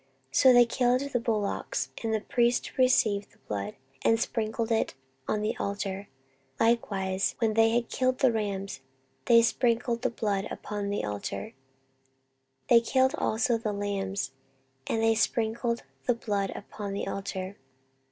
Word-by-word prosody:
14:029:022 - - -9
So 260 -1 +8
they 245 0 +7
killed 250 +1 +2
the 245 - +2
bullocks, 215 -3 -1
and 225 - 0
the 220 -1 0
priests 240 +2 +1
received 215 -6 +3
the - - -25
blood, 100 -1 -3 0.3
and 225 0 +3
sprinkled 225 0 -1
it 220 -10 +1 0.3
on 210 0 0
the 215 - 0
altar: 200 0 -3 0.5
likewise, 195 -5 +1
when 225 -3 +1
they 225 +1 +5
had 235 +1 +1
killed 255 0 0
the 260 - +4
rams, 200 -3 -3 0.5
they 230 -1 +6
sprinkled 235 0 +1
the 255 - +1
blood 205 -4 -1
upon 205 -1 -4
the 200 - -1
altar: 100 -1 -4 1.1
they 235 -1 +7
killed 260 +3 +2
also 230 +1 +1
the 215 -2 -2
lambs, 200 -1 -2 0.6
and 225 - 0
they 225 0 +5
sprinkled 230 +1 0 0.2
the 245 - +3
blood 205 -4 -1
upon 205 -1 -6
the 200 - -3
altar. 195 0 -4
220 Hz, 150 wpm, -28 LUFS, 200-235 Hz, 1.1 s, So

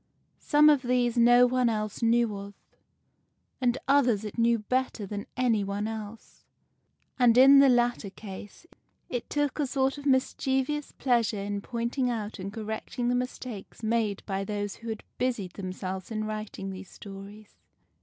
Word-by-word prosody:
Some 300 0 +4
of 295 -3 +5
these 245 -2 +1
no 240 +1 +6
one 250 -1 +2
else 215 -1 -3
knew 230 -2 +2
of, 200 0 -8 1.1
and 245 0 +2
others 250 -7 +3
it 210 - -6
knew 235 0 +3
better 250 0 -2
than 205 +1 -6
any 235 -5 +2
one 200 +2 -2
else; 220 0 -8 0.8
and, 245 -2 +5
in 275 +2 +9
the 275 -1 +7
latter 240 -4 +2
case, 200 - -10 0.4
it 245 -2 -4
took 290 0 -1
a 290 - +1
sort 270 +1 0
of 285 - -5
mischievous 265 +2 0
pleasure 235 -4 +1
in 200 0 -3
pointing 240 +3 -2
out 220 -4 -4
and 190 +1 -5
correcting 220 +3 -4
the - - +2
mistakes 250 -4 -5
made 220 -3 0
by 195 -1 -2
those 205 0 -4
who 230 - -8
had 220 -1 -5 0.2
busied 235 -8 -1
themselves 185 -1 -5
in 215 -1 -3
writing 215 -2 -5
these 190 0 -9
stories. 200 +1 -11
230 Hz, 155 wpm, -28 LUFS, 205-250 Hz, 1.1 s, in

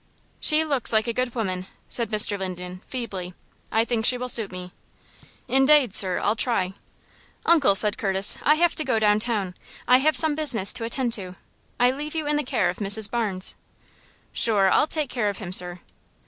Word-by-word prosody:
"She 310 +1 +3
looks 280 -6 -1
like 220 -1 +2
a 235 - -3
good 250 0 -3
woman," 185 -5 -4 0.2
said 235 -3 -2
Mr. 210 -1 +2
Linden, 185 -1 -7
feebly. 190 -8 -6 0.4
"I 225 +1 +1
think 235 -2 -2
she 250 +2 +4
will 250 0 -4
suit 225 -4 +2
me." 180 -1 -9 0.7
"Indade, 270 -2 +3
sir, 185 -3 +4
I'll 210 - 0
try." 205 -6 -1 0.7
"Uncle," 290 -12 +4
said 210 +1 +2
Curtis, 195 -1 0
"I 300 - +3
have 340 +1 +2
to 310 - -2
go 255 -5 0
downtown. 210 -2 0 0.3
I 250 +1 +6
have 310 +4 +2
some 315 -2 +3
business 275 -10 +2
to 230 - -4
attend 240 0 -2
to. 185 -5 -6 0.4
I 245 +1 +4
leave 295 +4 -7
you 315 -2 -2
in 295 0 0
the 295 - -1
care 240 -8 -1
of 180 - -13
Mrs. 205 +1 -1
Barnes." 205 -6 0 0.8
"Shure, 200 -4 +4
I'll - - +3
take 305 -4 -2
care 225 -5 -1
of 200 - -6
him, 185 -4 -7
sir." 180 -1 -2
225 Hz, 190 wpm, -23 LUFS, 195-260 Hz, 0.8 s, I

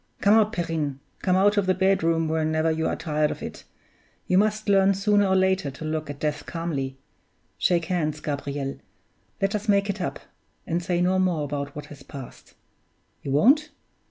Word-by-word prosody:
Come 205 - +4
out, 220 -1 +4
Perrine 160 -7 -2 0.2
come 185 -1 +2
out 205 +2 +4
of 200 -2 +2
the 185 - +3
bedroom 165 -4 +2
whenever 155 0 +1
you 160 0 0
are - - -1
tired 150 -1 0
of - - -6
it: - - -8 0.6
you 180 - +1
must 215 +2 +2
learn 195 -1 +4
sooner 205 +1 +3
or 190 - +2
later 190 -4 +2
to 140 +4 -8
look 155 -1 -3
at 145 -1 -6
death 150 -1 -2
calmly. 145 -6 -3 0.6
Shake 170 -2 +2
hands, 155 -4 -1
Gabriel; 145 -1 -3
and - - -9 0.6
let 195 - +2
us 210 +1 -3
make 200 0 +3
it - - -7
up, - - -3 0.5
and 170 +1 -1
say 175 0 0
no 185 +1 +2
more 180 -5 +1
about 140 -1 -4
what 150 - -6
has 145 - -14
passed. 135 -1 -11 0.7
You - - -6
won't? 275 - +4
170 Hz, 185 wpm, -25 LUFS, 150-195 Hz, 0.7 s, Come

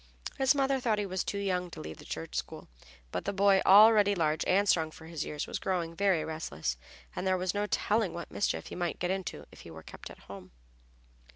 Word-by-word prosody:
His 270 +1 +4
mother 270 -1 +1
thought 230 -4 +1
he 205 - -1
was 185 -1 -2
too 200 - -3
young 180 -3 -1
to - - -10
leave 80 +1 -8
the - - -12
Church 80 0 -6
school, - - -5 0.4
but - - -4
the 200 - 0
boy, 195 -1 +4
already 205 0 +7
large 155 -3 0
and 200 +2 +3
strong 160 -4 +3
for 160 +1 -13
his 160 -2 -4
years, 150 - -4
was - - -5
growing 175 -3 -2
very 190 -4 +2
restless, 80 - -3 0.4
and 190 - -3
there 185 0 +2
was 185 0 -1
no 205 0 -1
telling 210 -2 +1
what 170 0 -7
mischief 205 - -1
he - - -7
might 175 -1 -2
get 180 - -1
into 190 -1 -4
if - - -15
he - - -12
were 80 -1 -11
kept - - -10
at - - -13
home. 95 -4 -12
185 Hz, 225 wpm, -30 LUFS, 160-200 Hz, 0.4 s, already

